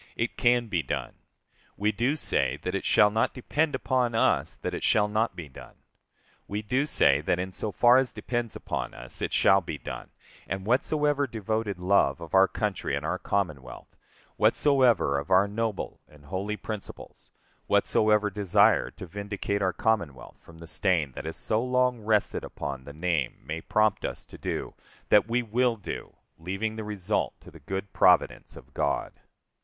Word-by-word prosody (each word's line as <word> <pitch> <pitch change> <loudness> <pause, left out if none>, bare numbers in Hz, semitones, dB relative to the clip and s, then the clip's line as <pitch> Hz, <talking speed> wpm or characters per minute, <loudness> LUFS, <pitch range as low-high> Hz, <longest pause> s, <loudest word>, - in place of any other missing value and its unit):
["It 115 +1 -2
can 120 -1 +3
be 90 -6 0
done."] 65 - -4 0.6
We 105 +1 +1
do 120 +7 0
say 155 - 0
that - - -2
it - - -2
shall 105 0 +5
not 110 +2 0
depend 145 +4 0
upon 125 -3 0
us 115 - +2
that - - -5
it - - -4
shall 105 -1 +3
not 110 +2 0
be 85 -3 -7
done. 65 - -13 0.7
We 105 +2 -3
do 130 +7 0
say 70 - +4
that 85 - 0
in 95 +1 -3
so 105 +3 -4
far 120 +6 +5
as 130 -1 +2
depends 115 +2 -3
upon - - -4
us - - -9
it - - -1
shall 95 +1 +4
be 80 -3 -5
done; - - -8 0.4
and 95 +1 -4
whatsoever 145 +4 +1
devoted 110 -2 -2
love 90 -6 +2
of 85 -1 -10
our 95 0 +6
country 100 +1 -2
and - - -4
our - - -1
Commonwealth; 70 -11 -3 0.4
whatsoever 125 - +3
of 70 - -8
our 95 +2 +5
noble 110 0 -3
and 75 -1 -19
holy 100 +7 -3
principles; 105 -2 -8 0.4
whatsoever 105 -1 +3
desire 105 +2 +3
to 95 - -10
vindicate 100 +2 -3
our 95 -1 +2
Commonwealth 95 - -2
from 85 - -16
the 85 - -11
stain 85 -4 0
that - - -8
has 80 - -5
so 110 +2 0
long 125 -1 +1
rested 105 -1 +1
upon 70 -2 -6
the 70 - -8
name 80 -3 -1
may 80 +3 -4
prompt 105 +2 +1
us - - -5
to - - -13
do, - - -4 0.4
that 105 +1 +5
we 120 +1 +1
will 120 +2 +1
do, 105 - -7 0.2
leaving 95 +6 -3
the 110 - -5
result 105 -1 -2
to - - -15
the - - -14
good 95 +1 -5
providence - - +3
of - - -14
God. - - -1
105 Hz, 175 wpm, -27 LUFS, 90-115 Hz, 0.7 s, our